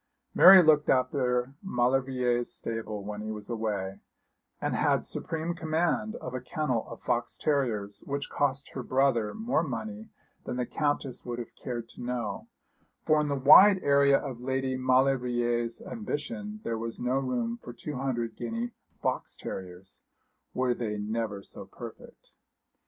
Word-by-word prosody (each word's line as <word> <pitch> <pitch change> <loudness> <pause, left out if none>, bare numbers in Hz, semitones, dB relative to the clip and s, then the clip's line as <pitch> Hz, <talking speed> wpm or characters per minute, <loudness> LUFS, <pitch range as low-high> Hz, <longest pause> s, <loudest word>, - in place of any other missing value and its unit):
Mary 190 0 +10
looked 150 -2 +4
after 130 -1 +1
Maulevrier's 125 -5 +1
stable 110 -2 -5
when 105 +1 -5
he 110 0 -4
was 105 +1 -7
away, 105 -4 -2 0.6
and - - -1
had - - +2
supreme 165 +1 -3
command 175 +6 0
of 130 - -7
a 130 - -3
kennel 130 -4 -2
of 115 - -8
fox 120 0 -1
terriers 110 -9 -1
which 140 0 -2
cost 140 0 -1
her - - -5
brother 130 -5 +1
more 220 -7 +1
money 215 +9 -5 0.3
than - - -4
the 125 - 0
Countess 145 -2 -2
would 120 -1 -4
have 120 -2 -7
cared 120 -3 -5
to - - -12
know; 120 -5 -3 0.6
for 155 0 +4
in 150 - -1
the 140 - 0
wide 185 +9 +8
area 140 -1 +5
of 130 -4 -6
Lady 130 0 -1
Maulevrier's 125 -2 +1
ambition 215 0 -5
there 115 -1 -2
was 115 0 -5
no 125 +2 +1
room 120 -3 -2
for - - -8
two 140 +4 -6
hundred 120 -4 -2
guinea 115 +1 -3 0.3
fox - - -2
terriers, 95 0 -8 0.5
were 130 -1 +2
they 110 -3 -3
never 105 -1 -3
so - - -9
perfect. - - -12
125 Hz, 150 wpm, -29 LUFS, 115-145 Hz, 0.6 s, Mary